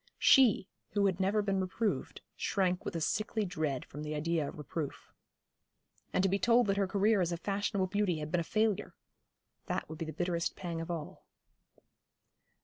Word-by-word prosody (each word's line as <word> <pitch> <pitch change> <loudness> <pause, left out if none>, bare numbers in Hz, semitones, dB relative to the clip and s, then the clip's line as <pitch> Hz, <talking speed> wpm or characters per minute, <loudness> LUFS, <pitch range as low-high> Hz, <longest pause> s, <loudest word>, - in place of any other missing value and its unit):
She, 245 -8 +6 0.3
who 200 -1 +3
had 190 -2 +1
never 200 +3 +2
been 195 -1 +1
reproved, 200 +4 -2
shrank 185 -2 0
with - - -4
a 165 - -1
sickly 215 +6 0
dread 155 -7 -2
from 145 - -9
the 150 0 -3
idea 155 0 0
of - - -10
reproof. 150 0 -5 1.0
And 185 - +2
to - - +4
be 195 +1 +1
told 235 +4 +4
that 195 -1 +1
her 200 -1 +2
career 205 +1 +3
as 175 -1 0
a 170 - -1
fashionable 200 +1 -1
beauty 190 -2 0
had 150 0 -5
been 175 - +2
a - - -2
failure! 215 +3 0 0.7
That - - -2
would 160 0 -8
be 165 - -2
the 155 - -5
bitterest 170 +1 -1
pang 170 -3 -4
of 165 - -6
all. 165 -3 -6
185 Hz, 185 wpm, -32 LUFS, 165-205 Hz, 1.0 s, She